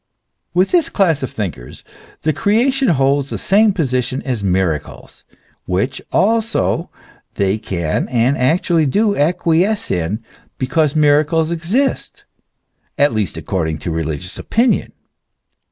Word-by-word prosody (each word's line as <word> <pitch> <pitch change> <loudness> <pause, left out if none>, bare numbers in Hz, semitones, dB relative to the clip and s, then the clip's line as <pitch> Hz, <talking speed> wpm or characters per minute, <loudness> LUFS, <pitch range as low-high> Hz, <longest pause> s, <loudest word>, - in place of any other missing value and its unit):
With 185 +2 +2
this 345 -4 +2
class 165 -8 +1
of 130 - -3
thinkers 80 - -6 0.4
the 155 0 +1
creation 250 - +1
holds 140 -3 +2
the - - -4
same 210 +2 +3
position 130 -6 -1
as 125 -6 -3
miracles, 90 -5 -2 0.4
which 95 +9 -1
also 225 +2 +1 0.5
they 100 +2 0
can 85 -7 -2
and 125 +2 +2
actually 160 +4 +2
do 205 +8 +2
acquiesce 175 +7 +1
in, 90 +6 -2 0.3
because 150 +3 0
miracles 155 +2 +3
exist, 190 +12 -1 0.7
at 145 -4 +3
least 105 -6 -2
according 80 -2 -2
to 80 +3 -5
religious 80 +2 -4
opinion. 235 +2 +1
145 Hz, 120 wpm, -17 LUFS, -, 0.7 s, same